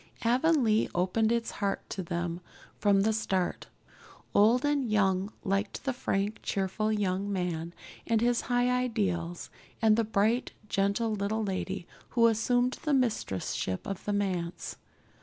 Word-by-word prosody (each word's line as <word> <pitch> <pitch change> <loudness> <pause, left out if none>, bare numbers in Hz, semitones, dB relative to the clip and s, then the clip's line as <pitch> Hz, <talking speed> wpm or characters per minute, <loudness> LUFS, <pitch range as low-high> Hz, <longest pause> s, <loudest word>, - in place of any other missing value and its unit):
Avonlea 245 -2 +3
opened 190 +5 +2
its 235 -1 0
heart 200 -1 -1
to 195 - -3
them 170 0 -3 0.4
from 200 -1 +4
the 220 +2 +2
start. 190 -4 -1 0.7
Old 230 +6 +5
and 285 -4 +1
young 195 -1 +2
liked 195 +1 -1
the 270 - 0
frank, 205 -4 -1
cheerful 200 +3 -1
young 200 -1 0
man 175 -3 -2 0.4
with 225 -1 +3
his 240 0 +2
high 245 0 +3
ideals, 200 -9 -1 0.3
and 220 -1 +5
the 230 - +2
bright, 220 +3 +1
gentle 200 +3 +1
little 210 +2 -1
lady 190 -2 -3 0.3
who 230 - +6
assumed 245 +3 +2
the 300 -2 +1
mistress 225 - 0
ship 95 -1 -3
of 195 -2 -5
the 205 - 0
manse. 185 -4 -2
210 Hz, 140 wpm, -29 LUFS, 190-230 Hz, 0.7 s, who